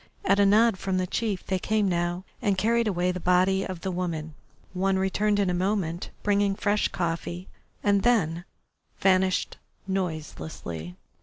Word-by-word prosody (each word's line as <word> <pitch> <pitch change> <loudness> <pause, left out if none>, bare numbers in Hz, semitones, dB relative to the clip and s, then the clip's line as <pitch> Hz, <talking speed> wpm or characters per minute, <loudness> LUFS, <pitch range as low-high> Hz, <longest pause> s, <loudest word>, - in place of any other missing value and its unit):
At 200 +1 +3
a 200 - +5
nod 215 0 +4
from 190 -1 -1
the 185 - +1
chief 205 0 -2
they 190 -1 -1
came 215 +1 +1
now 175 0 -1 0.2
and 200 -5 +1
carried 230 +4 +2
away 180 -2 +1
the 180 - -4
body 185 +2 +3
of 185 -3 -6
the 190 - -2
woman. 165 -3 -3 0.4
One 190 +1 +1
returned 205 +2 +1
in 195 -3 +2
a - - -1
moment, 180 -2 -1
bringing 200 -1 +2
fresh 210 0 +1
coffee, 175 +1 -3 0.4
and 200 -1 +3
then 175 -8 +1 0.5
vanished 185 -1 +2 0.3
noiselessly. 155 - -4
190 Hz, 155 wpm, -26 LUFS, 175-200 Hz, 0.5 s, a